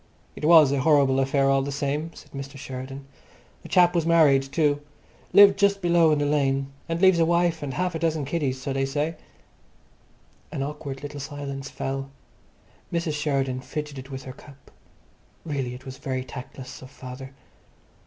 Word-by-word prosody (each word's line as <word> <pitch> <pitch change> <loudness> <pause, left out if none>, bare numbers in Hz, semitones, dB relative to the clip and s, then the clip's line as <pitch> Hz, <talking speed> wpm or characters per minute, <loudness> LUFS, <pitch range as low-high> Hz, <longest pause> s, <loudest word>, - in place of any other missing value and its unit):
"It - - -10
was 155 -4 +7
a 140 - +1
horrible 140 -2 +4
affair 135 +1 +2
all 135 0 +3
the 140 +1 -3
same," 145 +3 -2
said - - -14
Mr. 140 +1 -7
Sheridan. 135 0 -7 0.6
"The - - -12
chap 175 -1 +5
was 170 -2 +1
married 155 -5 +5
too. 145 +1 0 0.5
Lived 200 -1 +7
just 200 -1 +3
below 170 -3 +4
in 150 - +3
the 145 - 0
lane, 140 -2 +1 0.2
and 165 0 -1
leaves 185 -2 +5
a - - +5
wife 170 0 +1
and 140 -3 -4
half 180 0 -1
a 165 - -3
dozen 160 -3 0
kiddies, 140 -3 -1
so 135 +1 -3
they 135 0 0
say." 150 +4 -1 1.4
An 135 - -3
awkward 145 -1 -6
little 145 0 -6
silence 140 -1 -6
fell. 135 0 -4 0.8
Mrs. 170 -2 -1
Sheridan 140 -4 -1
fidgeted 140 -1 -6
with 135 -1 -7
her 130 - -8
cup. 140 0 -17 0.7
Really, 135 -5 -3
it 130 - -13
was 130 0 -9
very 130 -1 -3
tactless 130 0 -9
of 130 - -11
father.... 130 0 -10
140 Hz, 175 wpm, -25 LUFS, 135-160 Hz, 1.4 s, was